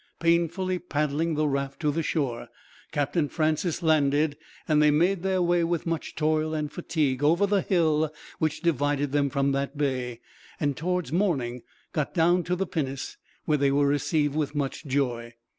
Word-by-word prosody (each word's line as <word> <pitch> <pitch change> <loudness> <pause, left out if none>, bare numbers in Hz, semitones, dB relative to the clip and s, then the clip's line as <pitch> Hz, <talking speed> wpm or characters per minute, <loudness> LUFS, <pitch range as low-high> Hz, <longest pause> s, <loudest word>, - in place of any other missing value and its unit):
Painfully 170 +2 +1
paddling 155 0 -1
the 155 0 +1
raft 140 -1 -2
to 150 -2 +2
the 165 +3 -1
shore, 140 -7 -2 0.4
Captain 145 +1 0
Francis 160 +2 0
landed; 150 -1 +3 0.3
and 150 -1 +4
they 150 - +6
made 170 +5 +2
their 190 -1 +1
way, 175 0 +2
with 170 -1 -1
much 165 -1 -3
toil 155 0 +1
and 150 -1 -2
fatigue, 145 -6 -1
over 170 +7 +4
the 200 -1 +2
hill 160 -5 +2 0.3
which 155 -1 -1
divided 145 -3 +1
them 145 -1 +2
from 140 0 +1
that 140 +1 -2
bay; 130 -4 -1 0.4
and, 145 -2 0
towards 180 -1 -2
morning, 140 -10 0 0.3
got 150 +4 -2
down 175 +1 +4
to 180 +1 -1
the 195 +2 -1
pinnace, 140 -6 -4 0.3
where 150 -2 +2
they 140 0 +3
were 140 +1 +3
received 145 +1 +1
with 150 -1 -1
much 145 +2 -3
joy. 120 -4 -1
150 Hz, 170 wpm, -26 LUFS, 140-170 Hz, 0.4 s, they